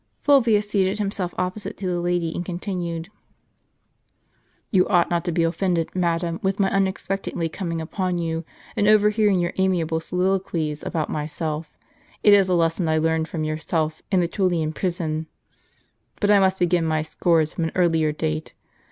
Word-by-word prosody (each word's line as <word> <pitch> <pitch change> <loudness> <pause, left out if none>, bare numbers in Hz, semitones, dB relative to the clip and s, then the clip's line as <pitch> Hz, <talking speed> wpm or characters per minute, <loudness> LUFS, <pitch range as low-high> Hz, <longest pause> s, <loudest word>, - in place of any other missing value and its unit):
Fulvius 230 -7 +4
seated 195 -1 +1
himself 195 -3 -2
opposite 185 +3 -3
to 195 - -6
the 180 -1 0
lady, 175 -1 0
and 175 - -3
con 180 -1 -5
tinued: 175 -3 -4 1.6
"You 185 -3 +4
ought 175 -3 +3
not 170 -1 +1
to 175 - 0
be 170 0 +1
offended, 170 0 0
madam, 170 -1 0
with 195 +1 -1
my 195 -1 +2
unex 195 -1 0
pectedly 180 -4 -2
coming 170 -4 -3
upon 180 +2 -2
you, 165 -1 -2 0.3
and 205 - +2
overhearing 210 -2 +4
your 175 0 -1
amiable 170 -4 +1
soliloquies 180 -3 -1
about 160 -4 -2
myself; 155 +1 -4 0.5
it 205 - +7
is 195 -2 +5
a 180 - +3
lesson 165 +1 +1
I 160 0 +2
learned 160 0 +1
from 160 -2 -4
your 155 0 -2
self 155 -1 -2
in 185 -2 +4
the 170 - +1
TuUian 170 -4 0
prison. 160 -3 -2 0.9
But 205 -1 +3
I 205 - +6
must 190 0 +3
begin 175 -1 +2
my 155 -1 0
scores 160 -1 +1
from 165 - -1
an 160 - -2
earlier 165 -4 +2
date. 80 - -3
175 Hz, 170 wpm, -23 LUFS, 160-190 Hz, 1.6 s, it